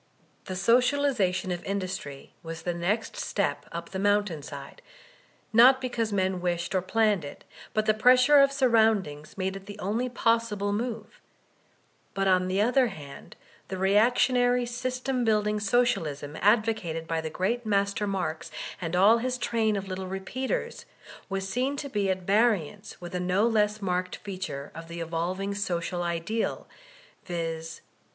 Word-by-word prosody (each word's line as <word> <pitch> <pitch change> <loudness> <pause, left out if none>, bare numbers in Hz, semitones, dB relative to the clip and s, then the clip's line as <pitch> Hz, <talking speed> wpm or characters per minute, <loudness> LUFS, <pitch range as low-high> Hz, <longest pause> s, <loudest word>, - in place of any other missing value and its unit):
The 185 - -5
socialization 235 -4 +2
of 175 -1 -4
in 200 +1 -1
dustry 180 -7 -6
was 165 -1 -7
the 175 - -1
next 190 +7 -1
step 145 -8 -2
up 170 0 -6
the 190 - -4
mountain 205 -5 +1
side, 140 -1 -9 0.7
not 255 +4 +7
be 255 -1 -3
cause 230 -2 -1
men 190 -2 0
wished 175 +1 -1
or 185 - +2
planned 210 -1 +1
it; 145 - -9 0.3
but 215 0 +2
the 215 - +4
pressure 250 +6 +6
of 275 0 +5
sur 275 -1 +2
roundings 205 -11 +1
made 190 0 -2
it 195 0 -10
the 205 0 -8
only 215 +6 -1
possible 230 -4 0
move; 225 0 -4 0.9
but 195 0 +1
on 185 -1 +3
the 185 +1 0
other 245 +4 +3
hand 145 -9 -10 0.3
the 190 - -5
reactionary, 245 +5 +3
system 255 +1 -2
building 210 -1 +1
Socialism 195 - 0
ad 215 +3 +5
vocated 170 -8 -3
by 165 0 -1
the 160 - -4
great 195 +9 -1
master 200 -1 0
Marx, 170 -4 -3 0.3
and 165 0 -2
all 205 +6 +6
his 250 +1 -2
train 225 -3 0
of 195 -1 -4
little 185 0 -5
repeaters, 255 - -4 0.4
was 195 0 -2
seen 255 +7 -1
to 280 0 -5
be 205 -5 0
at 185 -1 -1
variance 205 -1 +1
with 175 0 -8
a 180 - -1
no 185 +4 +2
less 210 -2 +1
marked 180 -1 -1
feature 185 -8 -6
of 165 +1 -9
the 170 0 -7
evolving 175 +4 -2
social 175 -3 -2
ideal, 175 +6 -2 0.6
viz. 165 -2 -4
200 Hz, 160 wpm, -27 LUFS, 180-230 Hz, 0.9 s, not